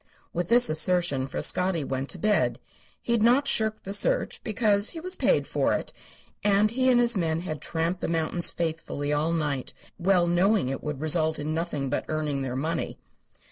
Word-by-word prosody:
With 175 0 -2
this 240 +1 +5
assertion 155 -4 +1
Frascatti 180 +3 0
went 135 0 -4
to - - -4
bed. 210 +4 +1 0.5
He - - -3
had 235 -2 +2
not 250 +5 +4
shirked 220 -1 0
the 195 - -5
search, - - 0
because 215 -2 +1
he 330 - -7
was 365 +3 -3
paid - - +2
for - - 0
it, - - -4 0.5
and 205 +1 +3
he 260 +2 +1
and 245 -1 +5
his 240 -1 +3
men 165 -3 0
had 155 -5 -5
tramped 170 +2 -2
the - - -1
mountains 165 +1 +2
faithfully 160 -3 -3
all 150 +3 0
night, 150 -5 -2 0.2
well 180 0 +3
knowing 180 -1 +2
it 135 - -4
would 150 -2 -4
result 155 0 +2
in 150 +1 -3
nothing 160 -4 -2
but - - -1
earning 150 -3 -2
their 130 -2 -3
money. 160 +5 -3
170 Hz, 185 wpm, -26 LUFS, 155-210 Hz, 0.5 s, this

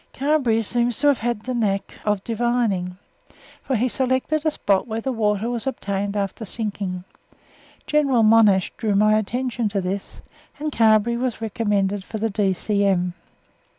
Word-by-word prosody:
Carberry 265 -6 +1
seems 240 +1 +1
to 290 0 +4
have 240 -3 -3
the 255 - -3
knack 205 -5 -1
of 210 -2 0
divining, 225 -6 -1 0.6
for 265 - -2
he 240 +3 +1
selected 260 +4 0
a 315 - +3
spot 200 -8 0
where 220 0 -3
water 220 -3 0
was 240 +1 -3
obtained 200 -5 -2
after 200 +2 -3
sinking. 200 -4 -4 0.8
General 280 -6 +2
Monash 215 -4 +5
drew 215 -3 0
my 215 +1 +4
attention 240 +1 -1
to 200 -1 -1
this, 190 +1 -5 0.3
and 305 +1 -3
Carberry 225 -1 +3
was 250 -1 -2
recommended 205 -3 -1
for 220 - -6
the 220 +1 -1
D.C.M. 195 -2 +1
220 Hz, 145 wpm, -22 LUFS, 200-245 Hz, 0.8 s, Monash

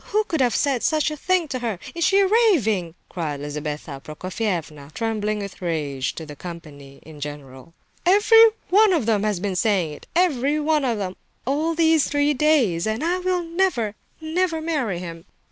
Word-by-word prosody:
Who 430 +1 +1
could 320 -8 -2
have 245 -3 +2
said 275 -5 +1
such 310 -1 +1
a - - -4
thing 360 +2 0
to 255 - -3
her? 230 -5 -2 0.2
Is 335 - -2
she 390 +2 +4
raving?" 280 - +2
cried 155 -5 -4
Lizabetha 145 -1 -5
Prokofievna, 165 -4 -4
trembling 215 -2 -1
with 200 -2 -7
rage, 145 -6 -2
to 160 - -7
the 150 -1 -10
company 145 -5 -10
in 155 -2 -13
general. 145 +1 -9 0.3
"Every 415 +5 +6 0.3
one 415 +1 +6
of 310 -10 +1
them 220 -3 +2
has 210 -3 0
been 195 0 -2
saying 180 -6 +1
it—every 295 - 0
one 300 -1 +1
of 235 -3 0
them—all 275 - -3
these 320 -2 +3
three 290 0 +2
days! 255 - +2
And 220 +5 -2
I 350 +2 0
will 365 -1 0
never, 330 - 0 0.3
never 325 +1 -1
marry 295 - -1
him!" 165 -2 -8
225 Hz, 170 wpm, -23 LUFS, -, 0.3 s, Every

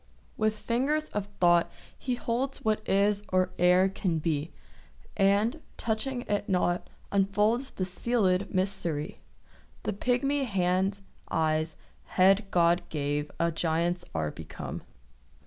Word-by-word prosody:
With 215 0 +1
fingers 275 +8 0
of 205 -1 -3
thought 175 -1 +4 0.3
he 250 -2 -2
holds 245 +3 -2
What 215 -1 +2
is 200 +1 +3
or 185 0 +2
e'er 180 +2 +5
can 185 -3 -1
be; 155 0 -1 0.6
And, 205 +9 +2 0.2
touching 240 +3 -1
it 205 -2 -2
not, 180 -1 +1 0.2
unfolds 210 +6 +2
The 185 - -4
sealèd 190 0 0
mystery. 185 -5 -2 0.6
The - - -1
pigmy 265 +6 +1
hands, 195 -1 0 0.3
eyes, 155 0 0 0.3
head 195 +2 +4
God 175 -1 +3
gave 145 -1 -2
A 170 0 +2
giant's 170 +2 0
are 75 -2 -1
become. - - -7
195 Hz, 120 wpm, -29 LUFS, 175-220 Hz, 0.6 s, e'er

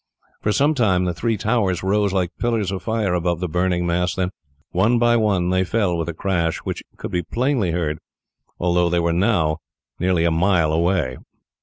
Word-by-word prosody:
For 105 - +1
some 145 +9 +3
time 100 -9 +2
the 90 - -1
three 115 +4 -1
towers 100 -4 0
rose 100 +1 +1
like 90 -2 -1
pillars 115 -5 0
of 95 - -4
fire 110 -5 -1
above 85 -1 0
the 90 - -2
burning 90 +1 0
mass; 90 +1 0
then 95 -1 -1 0.4
one 105 +7 +3
by 120 0 +3
one 100 -6 +1
they 95 0 +2
fell 95 -2 0
with 85 0 -2
a - - -3
crash, 85 -3 0
which - - -4 0.2
could - - -6
be 90 - 0
plainly 120 - 0
heard, 80 -3 -1 0.6
although 90 0 +2
they 85 0 +1
were 85 0 +1
now 85 -5 +2 0.4
near 90 0 +1
a 85 0 +2
mile 85 -2 +2
away. 80 -6 +1
90 Hz, 190 wpm, -21 LUFS, 85-105 Hz, 0.6 s, some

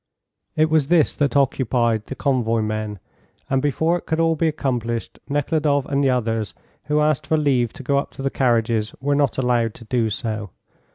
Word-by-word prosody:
It 155 0 +2
was 155 -3 +3
this 165 -1 +3
that 145 -3 +1
occupied 120 -5 +1
the 135 - -5
convoy 115 -6 +1
men, 110 -1 -3 0.5
and 135 -1 +2
before 160 +5 +1
it - - -21
could 160 0 0
all 165 0 +3
be 165 +1 +1
accomplished 120 -7 -2
Nekhludoff 145 -1 +1
and 140 0 0
the 135 - +3
others 115 -4 -1 0.3
who 150 0 +1
asked 150 -2 +1
for 160 - +2
leave 130 -6 +1
to 155 - -10
go 140 +1 +2
up - - -4
to 135 - -8
the 135 - 0
carriages 115 -4 +1
were 140 +2 0
not 140 -2 +1
allowed 120 -3 +1
to 115 - -13
do 115 0 0
so. 110 -2 -4
135 Hz, 190 wpm, -22 LUFS, 115-145 Hz, 0.5 s, was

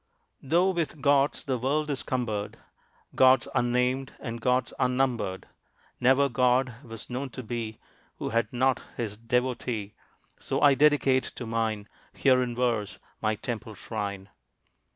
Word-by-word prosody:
Though 170 +7 +3
with 165 -4 -2
gods 140 +1 +2
the 130 -3 -1
world 150 +4 0
is 135 - -2
cumbered, 110 -5 -3 0.6
Gods 130 -2 +5
unnamed, 125 +2 +1
and 115 -2 -6
gods 125 0 +1
unnumbered, 125 -7 0 0.5
Never 130 +3 +4
god 125 0 +1
was 115 -2 -8
known 130 +2 -4
to 130 +1 -7
be 115 -1 -4 0.4
Who - - -3
had 115 +1 0
not 130 0 +2 0.2
his 110 -4 -3
devotee. 115 -2 -2 0.5
So - - -2
I 145 -1 +6
dedicate 135 -2 +4
to 120 - -6
mine, 110 -2 -1 0.3
Here 130 -2 +4
in 120 -1 -2
verse, 115 -4 0 0.2
my 110 0 +1
temple 110 0 -5
shrine. 100 -3 -5
125 Hz, 135 wpm, -27 LUFS, 115-130 Hz, 0.6 s, I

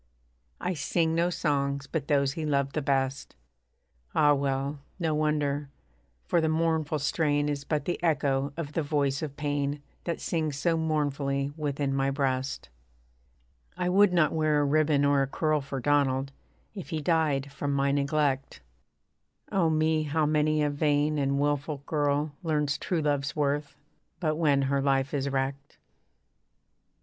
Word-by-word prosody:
I 180 - -1
sing 160 +1 0
no 170 +1 +2
songs 140 -4 -1
but 145 0 -3
those 140 -2 +2
he 160 -1 -4
loved 140 -2 0
the 155 - -1
best. 135 -1 -1 0.8
(Ah! 145 -1 +5
well, 140 +1 -1 0.2
no 165 -4 0
wonder: 150 -2 0 0.6
for 170 - +2
the 160 - +1
mournful 160 -1 +1
strain 145 0 +1
Is 145 -1 -2
but 150 0 -2
the 175 - -2
echo 140 -4 +1
of 150 -3 -5
the 165 - 0
voice 140 -2 0
of 145 -3 -5
pain, 145 -1 -1 0.3
That 170 -2 -2
sings 155 -4 -1
so 165 +2 +1
mournfully 145 -3 -1
within 145 -2 -2
my 135 0 +1
breast.) 135 - -2 1.1
I 180 - 0
would 200 +1 +5
not 170 -4 +3
wear 155 -2 +2
a 145 - +2
ribbon 145 0 +3
or 140 -1 +3
a 135 - +1
curl 155 +1 0
For 135 0 -5
Donald, 135 0 +1 0.4
if 195 -5 -8
he 160 - -2
died 150 -3 +1
from 140 +1 -3
my 140 0 +1
neglect 140 - 0 0.9
Oh 175 -4 +2
me! 155 0 +2
how 155 +1 0
many 155 0 +2
a 145 - +1
vain 145 +1 +1
and 140 0 +1
wilful 145 0 -1
girl 145 0 0
Learns 150 -4 0
true 175 -3 -1
love's 145 -1 0
worth, 145 -1 -1 0.4
but 155 -3 0
when 145 -4 +3
her 135 0 +1
life 135 0 +1
is 140 -1 -1
wrecked. 135 +1 -3
145 Hz, 155 wpm, -28 LUFS, 140-155 Hz, 1.1 s, Ah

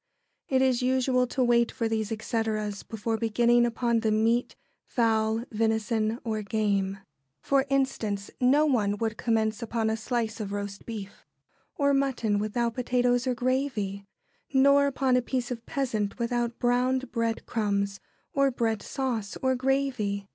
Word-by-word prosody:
It 265 -1 +3
is 255 -2 +2
usual 255 0 +2
to 255 +1 0
wait 235 -1 +3
for 230 - -2
these 220 -1 -2
etceteras 220 -2 -2
before 225 +1 -3
beginning 240 +1 +3
upon 235 0 0
the 220 -1 0
meat, 225 +3 +1 0.3
fowl, 225 -2 +1
venison, 220 0 0
or 220 -2 -2
game. 200 -2 0 0.4
For 275 - +1
instance, 225 -7 -1
no 280 +5 +5
one 210 -8 +1
would 225 0 -1
commence 220 -1 0
upon 225 -1 -1
a - - 0
slice 225 0 -2
of 205 -2 -4
roast 200 -1 -5
beef 210 -4 -8 0.5
or 280 -1 +2
mutton 255 -7 +1
without 230 +3 -1
potatoes 245 0 +1
or 250 - +1
gravy, 245 -6 -1 0.5
nor 280 +1 +5
upon 265 -2 +1
a - - +2
piece 250 0 -3
of 235 -2 -4
pheasant 220 -7 -2
without 240 0 -1
browned 255 +2 +1
bread 230 -1 -1
crumbs, 200 -3 -1 0.3
or 275 -3 +3
bread 225 -4 -1
sauce, 240 -7 -3
or 260 0 +3
gravy. 255 -7 -1
230 Hz, 145 wpm, -27 LUFS, 215-255 Hz, 0.5 s, no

